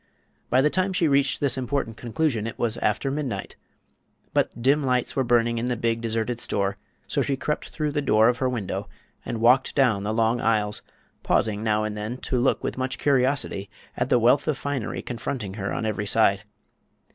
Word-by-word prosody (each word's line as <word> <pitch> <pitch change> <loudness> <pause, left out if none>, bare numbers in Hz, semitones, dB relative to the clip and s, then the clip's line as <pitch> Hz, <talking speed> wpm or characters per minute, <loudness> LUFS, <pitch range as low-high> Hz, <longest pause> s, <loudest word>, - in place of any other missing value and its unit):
By 130 +2 +4
the 150 - +3
time 185 +1 0
she 175 -3 +2
reached 140 -1 +2
this 135 -2 +2
important 130 -3 -2
conclusion, 120 -1 -1
it 115 - -6
was 115 -1 0
after 110 +6 0
midnight; 140 -3 -4 0.8
but - - 0
dim 140 +5 +3
lights 125 -2 0
were 135 - +2
burning 120 -1 +2
in 120 - -2
the 125 - 0
big, 115 0 0
deserted 115 +1 -2
store, 100 -3 -1 0.3
so - - 0
she 135 - 0
crept 150 +3 -3
through 150 -2 -2
the 145 0 -1
door 110 -5 +4
of 125 +1 +1
her 130 - +1
window 100 -4 -4 0.3
and 115 - -4
walked 125 +3 +4
down 125 -8 +3
the 105 +2 -2
long 115 +2 +1
aisles, 105 -2 +1 0.4
pausing 105 -1 +1
now 110 -1 +1
and 110 -1 -3
then 105 +4 -4
to 130 -1 -1
look 130 - +1
with - - -3
much 130 0 -2
curiosity 130 -7 +1 0.3
at 125 +1 -1
the - - +5
wealth 125 +5 +3
of 150 - +1
finery 140 -6 -3
confronting 115 -4 -4
her 95 -2 -4
on - - -2
every 105 -1 -2
side. 100 -1 +3
120 Hz, 195 wpm, -25 LUFS, 110-135 Hz, 0.8 s, the